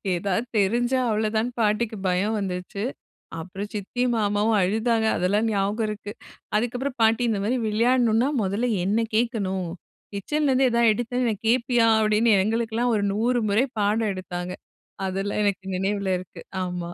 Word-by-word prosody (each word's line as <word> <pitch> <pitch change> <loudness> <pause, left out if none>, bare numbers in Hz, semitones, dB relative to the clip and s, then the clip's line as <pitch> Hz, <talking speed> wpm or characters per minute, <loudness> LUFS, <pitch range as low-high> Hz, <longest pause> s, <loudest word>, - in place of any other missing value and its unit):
எதாவது 195 +5 -1
தெரிஞ்சா 240 +6 +2
அவ்ளதான்னு 220 +2 0
பாட்டிக்கு 215 +1 0
பயம் 195 +5 +1
வந்துருச்சு. 190 +1 -4 0.6
அப்புறம் 195 +5 -7
சித்தியும், 240 +4 -1
மாமாவும் 210 +1 +1
அழுதாங்க. 220 +4 +1
அதெல்லாம் 205 +5 +1
ஞாபகம் 205 +2 0
இருக்கு. 210 -1 -6 0.4
அதுக்கப்புறம் 245 +4 -2
பாட்டி 225 +2 +3
இந்தமாரி 220 +3 0
விளையாட்ணுனா, 235 +2 +2
முதல 205 +6 0
என்ன 200 +4 +1 0.2
கேட்கணும் 200 -6 -1 0.5
கிச்சன்லேருந்து 265 +4 +1
எதா 235 0 +2
எடுத்தேன்னு 240 +2 -1
வை - - 0
கேப்பியா 240 0 +3
அப்பிடின்னு 215 +1 +3
எங்களுக்கெல்லாம் 230 +2 0
ஒரு 205 - 0
100 235 +4 +1
முறை 210 +5 +3
பாடம் 210 +1 +1
எடுத்தாங்க. 180 -1 -5 0.5
அதெல்லாம் 195 +2 -2
எனக்கு 200 -2 -1
நினைவுல 195 0 -1
இருக்கு. 180 0 -11 0.2
ஆமா 180 -1 -4
215 Hz, 130 wpm, -24 LUFS, 200-235 Hz, 0.6 s, பாட்டி